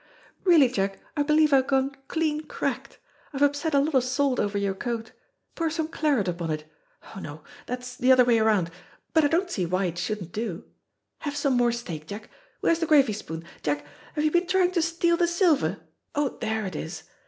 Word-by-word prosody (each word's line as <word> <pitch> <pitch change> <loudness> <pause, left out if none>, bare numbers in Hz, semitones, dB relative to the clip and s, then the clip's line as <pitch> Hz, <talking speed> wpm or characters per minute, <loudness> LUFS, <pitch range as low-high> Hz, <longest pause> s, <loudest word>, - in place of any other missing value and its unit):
"Really, 330 -7 +7
Jack, 195 -5 -1 0.2
I 295 - +1
believe 300 0 +4
I've 265 -1 +4
gone 270 0 +2 0.2
clean 310 -2 -1
cracked. - - -4 0.4
I've 275 +1 +1
upset 285 +2 +1
a - - +6
lot 295 +3 0
of 260 -2 +4
salt 255 +1 +1
over 205 0 0
your 200 -1 0
coat. 225 +2 -4 0.4
Pour 330 -1 -1
some 320 0 -2
claret 290 -11 +1
upon 170 -2 -2
it. 155 -1 -2 0.5
Oh, - - -6
no, 150 -3 -8 0.2
that's 250 0 -5
the 255 +1 +4
other 255 -1 +7
way 235 -2 +4
round, 210 -6 +2 0.4
but 320 -2 +5
I - - +5
don't 350 +4 0
see 180 - -1
why 185 +3 0
it 175 -1 -3
shouldn't 185 -2 -3
do. 210 -5 -4 0.6
Have 290 -1 -4
some 275 -3 +1
more 240 -1 +3
steak, 170 -10 -6
Jack. 210 +2 -8 0.3
Where's 335 - +2
the 330 - 0
gravy 280 -7 +5
spoon? 165 -6 -6 0.2
Jack, 145 -1 -1 0.3
have 300 - 0
you 305 - +3
been 350 +2 +2
trying 365 -1 +3
to 355 -2 +1
steal 340 +1 +2
the 345 -1 +3
silver? 340 -4 +2 0.4
Oh, 290 -1 +2
there 220 -2 -3
it 185 -4 -5
is. 160 +1 -5
255 Hz, 205 wpm, -26 LUFS, 200-310 Hz, 0.6 s, Really